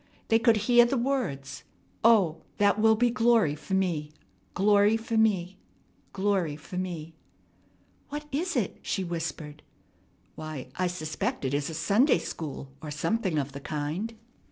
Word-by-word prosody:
They 225 - +5
could 230 -1 +4
hear 240 0 +7
the 250 +3 +1
words. 145 - -2 0.4
"O, 200 -8 +4 0.2
that 205 0 +3
will 220 0 +6
be 240 +2 +2
glory 230 -9 +3
for 155 +6 -4
me, 165 -6 -1 0.4
glory 205 +3 +4
for 225 +1 -4
me, 195 -4 +1 0.5
glory 190 -6 0
for 155 +4 -10
me 165 -3 -5 0.5
" - - -36
"What 295 +1 -5
is 345 +6 -1
it?" - - -1
she 190 - -2
whispered. 160 -3 -5 0.7
"Why, 155 -5 -7
I 185 - 0
suspect 155 -5 -3
it 130 - -1
is 145 +1 -1
a 160 - -6
Sunday 205 - +3
school 145 -4 -6
or 155 - -7
something 185 +4 -1
of 140 -1 -1
the 140 - -7
kind." 155 +11 -3
185 Hz, 155 wpm, -28 LUFS, 155-225 Hz, 0.7 s, hear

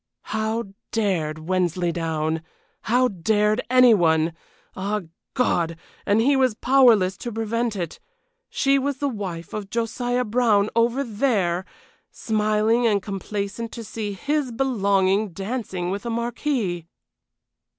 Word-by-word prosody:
How 220 +1 0 0.3
dared 180 -9 0
Wensleydown! 165 -3 0 0.4
How 250 +3 +3
dared 210 +3 +1
any 250 -2 +7
one! 160 -4 +3 0.4
Ah, 205 +2 -2 0.3
God! 170 -10 +1 0.3
and 205 +2 +4
he 275 +4 +4
was 260 -4 +2
powerless 235 -7 +4
to 240 - -5
prevent 225 +1 -1
it. 175 -4 -4 0.5
She 275 0 +2
was 280 0 -2
the 285 - -1
wife 190 -9 -5
of 210 -2 -5
Josiah 245 +2 -1
Brown 215 -3 +2
over 235 +4 +2
there, 205 -7 0 0.4
smiling 215 +2 +1
and 205 -2 +3
complacent 200 +3 -4
to 230 - -6
see 215 -1 -4
his 285 +5 -1
belonging 200 -5 +1
dancing 195 -3 -3
with 200 +1 -3
a 235 - -4
marquis! 235 - -2
215 Hz, 120 wpm, -23 LUFS, 190-240 Hz, 0.5 s, any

